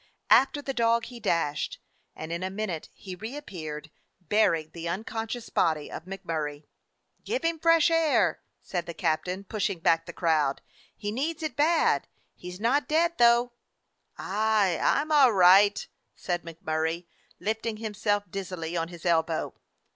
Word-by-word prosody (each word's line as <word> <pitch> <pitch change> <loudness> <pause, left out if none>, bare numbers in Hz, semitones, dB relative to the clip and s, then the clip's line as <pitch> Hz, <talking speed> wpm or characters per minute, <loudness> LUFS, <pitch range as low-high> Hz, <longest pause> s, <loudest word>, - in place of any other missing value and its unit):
After 275 +2 +5
the 270 - -3
dog 235 -1 +2
he 240 0 -10
dashed, 165 -8 -1 0.4
and 160 +1 -7
in 170 +1 -3
a 185 - -2
minute 190 -5 -4
he 190 - -10
reappeared, 180 - -7 0.3
bearing 165 -4 +1
the 170 0 -5
unconscious 225 +5 -4
body 155 -3 +1
of 160 - -7
MacMurray. 160 -6 -5 0.6
"Give 470 -2 -2
him 330 -1 0
fresh 330 0 +4
air," 275 - +2 0.2
said 175 -2 -4
the 170 - -6
captain, 180 +5 -1
push 210 +1 -1
ing 195 - -4
back 165 0 +2
the - - -5
crowd. 155 -5 +1 0.3
"He 205 - -4
needs 315 +8 -3
it 310 - -3
bad. 320 +3 +2 0.3
He 180 - -10
's 180 +1 -9
not 250 +7 +1
dead, 335 +2 +1
though." 240 +1 +5 0.7
"Aye, 205 -3 +1
I - - +3
'm 310 +2 -6
all 275 -6 +6
right," 195 +2 +5 0.3
said 175 -1 -3
MacMurray, 160 +1 -3 0.3
lifting 220 +3 -2
himself 210 -1 -1
dizzily 180 -4 -5
on 165 -1 -1
his 170 0 -12
elbow. 165 -1 +1
195 Hz, 155 wpm, -27 LUFS, 165-235 Hz, 0.7 s, all